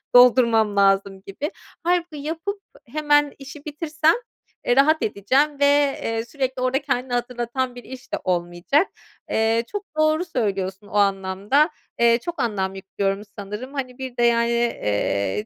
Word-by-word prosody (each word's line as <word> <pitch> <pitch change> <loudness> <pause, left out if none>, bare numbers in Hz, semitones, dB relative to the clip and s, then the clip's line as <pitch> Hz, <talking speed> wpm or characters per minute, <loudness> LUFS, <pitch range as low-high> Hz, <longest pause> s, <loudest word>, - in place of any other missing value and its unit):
doldurmam 235 -4 +6
lazım 195 -1 +2
gibi. 285 - -4 0.3
Hâlbuki 345 -2 0
yapıp 325 +7 -4 0.3
hemen 295 +1 +2
işi 285 +1 -11
bitirsem, 310 +1 +1 0.5
eee, 245 - +4
rahat 310 +4 +4
edeceğim 270 +9 +1
ve, 285 - +4 0.4
eee, 225 0 -2
sürekli 260 0 -3
orada 255 +2 +1
kendini 260 -2 -2
hatırlatan 245 +1 -2
bir 245 - -9
iş 260 -1 -11
de - - +2
olmayacak. 175 - +1 0.4
Eee, 225 +1 +2
çok 410 -1 -4
doğru 310 +3 +2
söylüyorsun 200 - -2
o - - -14
anlamda, 200 - +2 0.3
eee, 235 0 +5
çok 345 +4 -6
anlam 195 -4 -1
yüklüyorum 195 +1 -2 0.2
sanırım 210 +7 -6
hani 255 -3 -4
bir 260 -2 -7
de 240 - +2
yani, 235 0 +3
eee, 105 - 0
245 Hz, 145 wpm, -23 LUFS, 200-290 Hz, 0.5 s, doldurmam